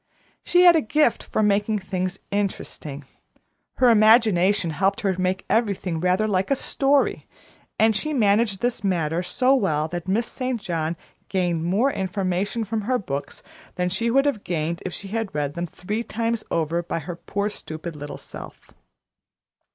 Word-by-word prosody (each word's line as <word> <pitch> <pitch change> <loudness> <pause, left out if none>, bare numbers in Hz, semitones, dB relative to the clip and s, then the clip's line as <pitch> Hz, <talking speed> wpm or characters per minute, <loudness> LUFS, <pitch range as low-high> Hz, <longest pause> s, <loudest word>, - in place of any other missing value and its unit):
She 355 0 +4
had 350 -1 +8
a 320 - +4
gift 295 +1 +2
for 215 - -1
making 210 +1 +2
things 185 -1 -3
interesting. 160 -8 -3 0.7
Her 250 -2 +5
imagination 210 -5 +4
helped 190 +6 0
her 195 -2 +1
to 185 - -4
make 185 +1 -1
everything 200 -7 0
rather 185 +5 +2
like 190 -2 0
a 275 - +3
story, 275 +1 +1 0.5
and 220 0 +4
she 305 +8 0
managed 210 -5 +2
this 240 -4 -1
matter 170 -3 0
so 250 +9 +2
well 160 - +1
that 175 +1 -5
Miss 215 +5 +1
St. 255 -1 -3
John 165 -3 -2 0.3
gained 175 -4 0
more 210 +10 +2
information 190 +3 -1
from 220 +1 -2
her 250 +5 0
books 140 - -5 0.3
than 180 0 0
she 210 +6 0
would 275 +4 +3
have 255 -8 0
gained 170 0 -2
if - - -5
she 195 +2 -6
had 220 -3 -3
read 145 -1 -1
them 175 +2 -3
three 210 +7 -4
times 230 -1 -2
over 165 +1 0
by 170 - -4
her 170 +2 -5
poor 200 +4 -3
stupid 160 -5 -7
little 145 0 -7
self. - - -11
195 Hz, 165 wpm, -23 LUFS, 175-225 Hz, 0.7 s, had